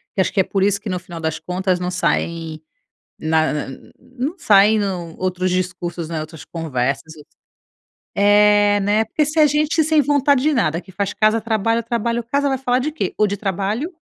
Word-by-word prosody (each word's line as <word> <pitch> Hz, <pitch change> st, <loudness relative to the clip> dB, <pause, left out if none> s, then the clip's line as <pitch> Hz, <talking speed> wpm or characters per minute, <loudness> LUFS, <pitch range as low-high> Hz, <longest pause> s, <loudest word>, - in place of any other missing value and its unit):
Que 190 Hz, -, +2 dB
acho -, -, 0 dB
que 200 Hz, -, -1 dB
é -, -, +5 dB
por 195 Hz, +1 st, -1 dB
isso 200 Hz, 0 st, +2 dB
que 215 Hz, -, -7 dB
no 185 Hz, -, -1 dB
final 175 Hz, -1 st, -9 dB
das 160 Hz, 0 st, -2 dB
contas 185 Hz, 0 st, -1 dB
não 180 Hz, 0 st, -3 dB
saem 165 Hz, -3 st, -2 dB, 0.6 s
na 160 Hz, 0 st, +1 dB
na 150 Hz, -, -3 dB, 0.3 s
não 260 Hz, +6 st, -5 dB
saem 210 Hz, -, +5 dB
no 180 Hz, -5 st, -3 dB
outros 185 Hz, 0 st, -1 dB
discursos, 180 Hz, -2 st, -3 dB
né, 160 Hz, -2 st, -3 dB
outras 155 Hz, 0 st, -10 dB
conversas, 155 Hz, -1 st, -3 dB
outras 150 Hz, -, -17 dB, 0.8 s
É, 205 Hz, 0 st, +4 dB
né. 205 Hz, +2 st, +1 dB
Porque 300 Hz, +8 st, 0 dB
se 305 Hz, +2 st, -1 dB
é 300 Hz, -, +7 dB
gente 305 Hz, +2 st, +1 dB
sem 310 Hz, 0 st, +3 dB
vontade 285 Hz, -1 st, +2 dB
de 305 Hz, +3 st, +2 dB
nada, 170 Hz, -, 0 dB
que 190 Hz, -, -16 dB
faz 200 Hz, +1 st, -3 dB
casa-trabalho, 225 Hz, +1 st, +1 dB
trabalho-casa, 235 Hz, +4 st, -1 dB
vai 265 Hz, -, 0 dB
falar 250 Hz, -1 st, 0 dB
de 290 Hz, +4 st, -2 dB
quê? 310 Hz, -, -3 dB
Ou 210 Hz, -, +3 dB
de 200 Hz, 0 st, -3 dB
trabalho, 205 Hz, -, -2 dB
205 Hz, 190 wpm, -20 LUFS, 180-240 Hz, 0.8 s, é